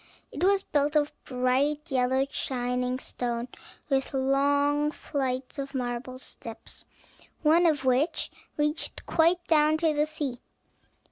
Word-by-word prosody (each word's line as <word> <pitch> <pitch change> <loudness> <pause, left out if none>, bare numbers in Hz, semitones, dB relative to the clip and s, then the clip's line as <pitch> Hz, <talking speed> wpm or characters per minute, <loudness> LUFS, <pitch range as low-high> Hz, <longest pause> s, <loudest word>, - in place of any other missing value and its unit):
It - - -4
was 390 +1 +4
built 290 +1 +1
of 295 -1 +3
bright 275 +5 0
yellow 260 +1 +2
shining 250 0 -1
stone, 240 -1 -3 0.4
with 270 -1 0
long 285 +2 +2
flights 265 -3 -3
of 275 0 -5
marble 250 0 -3
steps, 230 -3 -7 0.6
one 330 +3 +5
of 290 -4 +1
which 260 +6 +1 0.3
reached 300 +1 -1
quite 345 +2 +3
down 305 -1 +4
to 320 -1 +2
the 300 +1 +1
sea. 290 -5 -4
280 Hz, 125 wpm, -28 LUFS, 255-300 Hz, 0.6 s, one